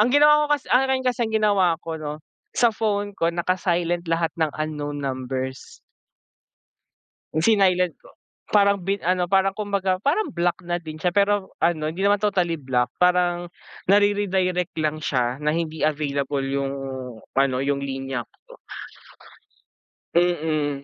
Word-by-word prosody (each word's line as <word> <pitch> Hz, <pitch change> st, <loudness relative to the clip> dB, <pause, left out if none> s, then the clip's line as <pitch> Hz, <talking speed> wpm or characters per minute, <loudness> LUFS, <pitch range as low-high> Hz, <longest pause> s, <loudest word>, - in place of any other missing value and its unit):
ang 215 Hz, -, +5 dB
ginawa 295 Hz, +2 st, +5 dB
ko 295 Hz, -, +4 dB
kas 280 Hz, -, -15 dB
akin 260 Hz, +1 st, +3 dB
kasi, 250 Hz, -1 st, 0 dB
ang -, -, -8 dB
ginawa 200 Hz, -6 st, +3 dB
ko, 160 Hz, -1 st, -5 dB
'no, 150 Hz, 0 st, -6 dB, 0.3 s
sa 235 Hz, -2 st, +4 dB
phone 205 Hz, -2 st, -1 dB
ko 165 Hz, -3 st, 0 dB
naka-silent 175 Hz, 0 st, -1 dB
lahat 165 Hz, 0 st, 0 dB
ng 160 Hz, -, +3 dB
unknown 150 Hz, -1 st, -3 dB
numbers. 130 Hz, -1 st, -4 dB, 1.6 s
Hmm, 155 Hz, -, -1 dB
sinilent 185 Hz, -4 st, +3 dB
ko, -, -, -17 dB, 0.4 s
parang 200 Hz, -2 st, +3 dB
bin 195 Hz, +2 st, -1 dB
ano 180 Hz, 0 st, +1 dB
parang 195 Hz, 0 st, +3 dB
kumbaga 200 Hz, -3 st, 0 dB
parang 335 Hz, +10 st, +1 dB
block 175 Hz, +1 st, 0 dB
na 175 Hz, -, 0 dB
din 155 Hz, -1 st, -8 dB
siya. 175 Hz, +1 st, 0 dB
Pero 200 Hz, -1 st, +1 dB
ano, 170 Hz, -2 st, +2 dB
hindi 170 Hz, +5 st, -3 dB
naman 205 Hz, 0 st, +3 dB
totally 180 Hz, -6 st, 0 dB
block, 125 Hz, -2 st, 0 dB
parang 180 Hz, -1 st, +2 dB, 0.4 s
nar-eredirect 195 Hz, -3 st, +2 dB
lang 155 Hz, 0 st, -1 dB
siya 130 Hz, -4 st, -1 dB
na 150 Hz, 0 st, 0 dB
hindi 160 Hz, -2 st, -1 dB
available 145 Hz, -2 st, -1 dB
yung 135 Hz, 0 st, -2 dB, 0.6 s
ano, 135 Hz, -2 st, +3 dB
yung 140 Hz, 0 st, 0 dB
linya 135 Hz, -2 st, -4 dB
ko. -, -, -19 dB, 1.5 s
Mm, 155 Hz, -5 st, 0 dB
175 Hz, 145 wpm, -23 LUFS, 150-200 Hz, 1.6 s, ang